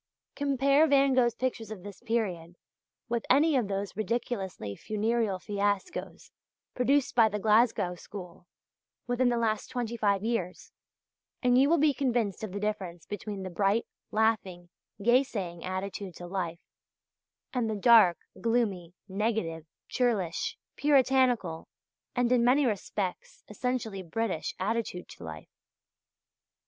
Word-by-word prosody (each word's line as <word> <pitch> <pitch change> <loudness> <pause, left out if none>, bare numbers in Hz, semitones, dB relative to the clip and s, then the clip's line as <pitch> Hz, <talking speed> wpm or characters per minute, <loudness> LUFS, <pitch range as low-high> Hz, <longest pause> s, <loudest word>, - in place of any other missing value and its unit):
Compare 280 +2 +3
Van 275 -2 +4
Gogh's 240 -2 +3
pictures 235 -4 -3
of 210 -5 -8
this 205 -1 -10
period 190 -8 -2 0.5
with 235 -1 -1
any 295 +3 +5
of 245 -6 +2
those 195 0 -3
ridiculously 210 - -3
funereal 215 - 0
fiascos 205 - -3 0.4
produced 270 +2 +2
by 230 -2 +5
the 210 - -2
Glasgow 215 -3 +3
school 180 -1 -10 0.6
within 245 0 +2
the 240 - +1
last 220 -2 0
twenty 240 -2 -3
five 200 -3 +1
years, 220 -6 -3 0.7
and 245 0 +4
you 270 +3 +5
will 335 - +4
be 300 -1 +4
convinced 240 -8 -1
of 215 - -4
the 200 - -4
difference 190 -5 -3
between 205 -1 -5
the 185 - -5
bright, 200 +5 +1 0.2
laughing, 195 -5 0 0.3
yea 240 +5 +4
saying 180 -10 -5
attitude 185 0 -4
to 175 - -8
life, 175 -2 -4 0.9
and 245 -3 0
the 215 - -1
dark, 210 -4 +6 0.2
gloomy, 205 -7 0
negative, 190 -6 -2 0.2
churlish, 215 -10 0 0.2
Puritanical, 255 - +2 0.5
and, 245 -1 +2
in 245 -2 +4
many 265 +4 +4
respects, 200 -4 -3
essentially 220 -2 -2
British 185 0 -3
attitude 205 -2 -2
to - - -11
life. 80 -1 -9
215 Hz, 130 wpm, -29 LUFS, 190-245 Hz, 0.9 s, dark